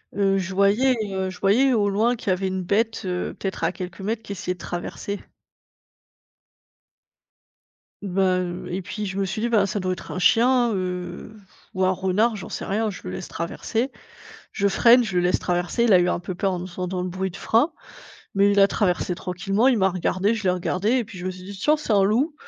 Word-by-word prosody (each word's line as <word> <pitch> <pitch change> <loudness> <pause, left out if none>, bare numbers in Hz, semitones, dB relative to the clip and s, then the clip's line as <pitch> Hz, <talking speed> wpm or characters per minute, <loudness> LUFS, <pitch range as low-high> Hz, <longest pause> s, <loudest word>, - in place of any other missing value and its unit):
heu, 195 -1 +2
je 190 0 -3
voyais, 210 +7 +4 0.2
heu, 190 0 -1
je 185 - -10
voyais 245 +7 +4
au 205 -3 +2
loin 220 +5 +2
qu'il 215 - -5
y - - +4
avait 190 +1 -2
une 185 0 -2
bête, 220 +5 0
heu, 180 -1 -2
peut-être 190 -3 -4
à 165 - +1
quelques 185 +1 -7
mètres 220 +3 -2
qui - - -9
essayait 180 -1 -3
de 175 - -25
traverser 195 +3 -5 2.8
bah, 190 -1 +1
heu 175 -1 -4
et 180 +2 -2
puis 210 +3 -5
je 190 0 -4
me 195 - +1
suis 195 +3 -3
dit: 235 - 0
«Ben 210 -4 +3
ça 200 +1 -2
doit 185 0 -2
être 180 - -7
un 185 - -3
chien, 240 +5 +4
heu, 180 +1 -4
pff 205 - -18 0.3
ou 185 0 +1
un 185 - +3
renard, 190 +5 +1
j'en 195 - -7
sais - - -5
rien, 215 +2 0
je 195 - -9
le 90 - -5
laisse 95 - -6
traverser». 225 +9 -3 0.6
Je 200 -3 +1
freine, 235 +5 +6
je 195 -5 -2
le 175 - +3
laisse 180 - +2
traverser, 175 +6 -1
il 230 -3 +4
a 180 - +7
eu 180 0 +2
un - - 0
peu 180 +1 -5
peur 190 +2 -1
en 175 - -3
entendant 180 0 -4
le 180 - -3
bruit 190 +2 -2
de 185 - -10
frein, 240 +9 +2 0.6
mais 200 +1 +4
il 200 - +4
a 195 - +6
traversé 180 -3 0
tranquillement. 195 +7 0
Il 250 -4 +3
m'a 190 -1 +4
regardé, 190 +3 0
je 215 - -4
l'ai 185 - +4
regardé 180 +3 -1
et 240 - -1
puis 210 -2 -12
je 180 - -7
me 185 - -1
suis 185 0 -10
dit: 200 +1 -9
«Tiens 300 +9 +2
c'est 240 -7 0
un 195 -1 +5
loup» 255 +10 +1
195 Hz, 230 wpm, -23 LUFS, 185-215 Hz, 2.8 s, a